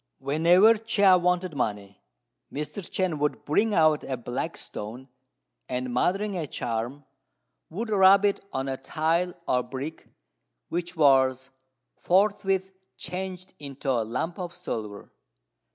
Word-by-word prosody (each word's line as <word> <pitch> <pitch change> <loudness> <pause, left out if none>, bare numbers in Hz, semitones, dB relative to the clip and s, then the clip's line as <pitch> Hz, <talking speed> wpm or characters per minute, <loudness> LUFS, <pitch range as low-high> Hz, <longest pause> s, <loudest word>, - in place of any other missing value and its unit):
Whenever 175 +10 +4
Chia 205 -4 +4
wanted 180 -1 0
money, 100 -6 -3 0.5
Mr. 150 +5 -5
Chên 180 -3 -2
would 150 0 -1
bring 210 +9 +2
out 155 -2 +4
a 130 - -3
black 125 +7 -4
stone, 115 +6 -8 0.6
and, 125 0 -3
muttering 195 +10 0
a 165 -4 -3
charm, 120 +4 -4 0.6
would 225 +7 -4
rub 195 0 +6
it 200 - 0
on 135 +1 -3
a 135 -1 -2
tile 165 +6 0
or 125 - +3
a - - 0
brick, 135 +5 -7 0.6
which 175 +1 -3
was 135 -3 +3 0.5
forthwith 190 0 +1 0.2
changed 185 +1 -6
into 140 -1 -4
a 120 -3 +1
lump 125 - -3
of 180 -1 -5
silver. 105 -2 -6
160 Hz, 130 wpm, -26 LUFS, 130-185 Hz, 0.6 s, rub